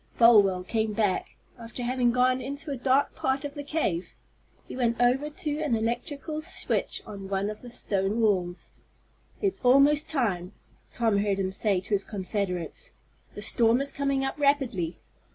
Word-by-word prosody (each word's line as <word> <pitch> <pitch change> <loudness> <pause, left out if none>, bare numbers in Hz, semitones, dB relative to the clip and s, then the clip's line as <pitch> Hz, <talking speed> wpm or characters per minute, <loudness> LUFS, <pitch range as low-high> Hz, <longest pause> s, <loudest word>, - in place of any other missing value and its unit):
Folwell 205 -6 +5
came 220 +2 -1
back, 205 -3 -1 0.2
after 235 +2 -7
having 245 0 +1
gone 255 +1 +2
into 280 +4 -5
a - - -1
dark 265 +2 +2
part 265 +2 -1
of 285 - -5
the 290 -1 -6
cave. 280 - -2 0.5
He - - -8
went 235 -2 0
over 255 +5 +2
to 300 -1 -3
an 290 -7 +1
electrical 260 +7 -3
switch 335 - -1
on 195 -2 -8
one 200 +1 -1
of 215 - -10
the 245 - -10
stone 200 -2 -1
walls. 185 -5 0 0.7
"It's 390 -2 0
almost 275 +4 +5
time," 205 - -1 0.4
Tom 225 -4 +1
heard 200 -1 0
him 190 -1 -1
say 195 -1 +1
to - - -12
his 200 -1 +3
confederates. 190 -3 -3 0.5
"The - - -5
storm 230 0 +3
is 280 0 -1
coming 275 -1 0
up 270 - -4
rapidly." 255 - +1
235 Hz, 165 wpm, -27 LUFS, 200-275 Hz, 0.7 s, Folwell